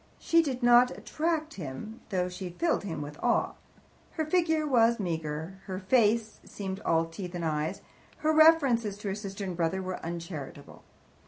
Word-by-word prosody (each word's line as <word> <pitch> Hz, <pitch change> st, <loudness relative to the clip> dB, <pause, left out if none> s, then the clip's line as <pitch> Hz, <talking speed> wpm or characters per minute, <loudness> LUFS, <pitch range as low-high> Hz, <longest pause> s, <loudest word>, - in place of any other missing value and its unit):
She 335 Hz, 0 st, +3 dB
did 265 Hz, -5 st, -3 dB
not 240 Hz, +1 st, +7 dB
attract 315 Hz, 0 st, -2 dB
him, 150 Hz, -, -7 dB
though 180 Hz, -2 st, 0 dB
she 180 Hz, 0 st, -6 dB
filled 320 Hz, -, 0 dB
him 165 Hz, -6 st, -4 dB
with 145 Hz, +1 st, -9 dB
awe. 240 Hz, -, +2 dB, 0.6 s
Her 315 Hz, -, -1 dB
figure 320 Hz, -1 st, +2 dB
was 235 Hz, -4 st, +3 dB
meagre, 160 Hz, 0 st, -4 dB
her 185 Hz, -1 st, -4 dB
face 220 Hz, +2 st, +2 dB
seemed 190 Hz, -1 st, -6 dB
all 165 Hz, -5 st, +1 dB
teeth 175 Hz, +2 st, -7 dB
and 170 Hz, -1 st, -3 dB
eyes, 155 Hz, -1 st, -2 dB, 0.4 s
her 310 Hz, -, +4 dB
references 275 Hz, -10 st, +5 dB
to 205 Hz, -1 st, -4 dB
her -, -, -1 dB
sister 200 Hz, -1 st, -6 dB
and 185 Hz, -2 st, -4 dB
brother 170 Hz, +2 st, 0 dB
were 185 Hz, -1 st, -5 dB
uncharitable. 165 Hz, -4 st, -7 dB
200 Hz, 165 wpm, -29 LUFS, 170-250 Hz, 0.6 s, not